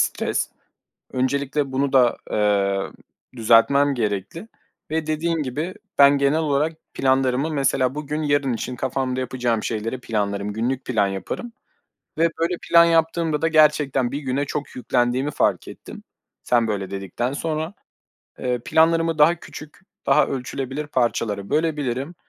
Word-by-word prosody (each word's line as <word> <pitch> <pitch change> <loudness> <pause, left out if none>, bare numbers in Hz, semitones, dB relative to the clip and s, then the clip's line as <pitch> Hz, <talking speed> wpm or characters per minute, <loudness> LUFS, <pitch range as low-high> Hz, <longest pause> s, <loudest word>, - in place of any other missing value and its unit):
stres. - - 0 0.6
Öncelikle 135 +2 -1
bunu 135 +1 0
da, 125 -3 +4
eee, 100 -2 +1 0.6
düzeltmem 130 +6 +4
gerekli. 110 - -3 0.4
Ve 160 -1 -1
dediğin 165 +2 -1
gibi, 150 +8 -4 0.2
ben 140 0 +7
genel 140 +3 +2
olarak 150 0 +1 0.2
planlarımı 130 +2 +1
mesela 135 -3 +1
bugün, 150 +1 -3
yarın 145 -3 +1
için 125 +2 -4
kafamda 130 0 -2
yapacağım 125 -3 -1
şeyleri 115 +3 -3
planlarım, 105 -3 -2
günlük 125 +4 -2
plan 105 -5 +1
yaparım 95 - -5 0.7
ve 165 +1 +3
böyle 170 +2 +1
plan 170 0 +6
yaptığımda 165 -1 +1
da 165 - +2
gerçekten 150 -5 +3
bir 140 - -3
güne 140 0 -1
çok 145 +1 -5
yüklendiğimi 125 +3 0
fark - - 0
ettim - - -11 0.4
sen 120 -2 +2
böyle 100 -3 -3
dedikten 100 +6 -3
sonra. 160 +3 -3 0.7
Eee, 125 -1 -1
planlarımı 165 0 +3
daha 155 +3 +5
küçük, 150 -2 -12 0.3
daha - - +4
ölçülebilir 135 +2 -4
parçalara 115 -6 -1
bölebilirim, 150 -1 -1
135 Hz, 130 wpm, -22 LUFS, 120-155 Hz, 0.7 s, ben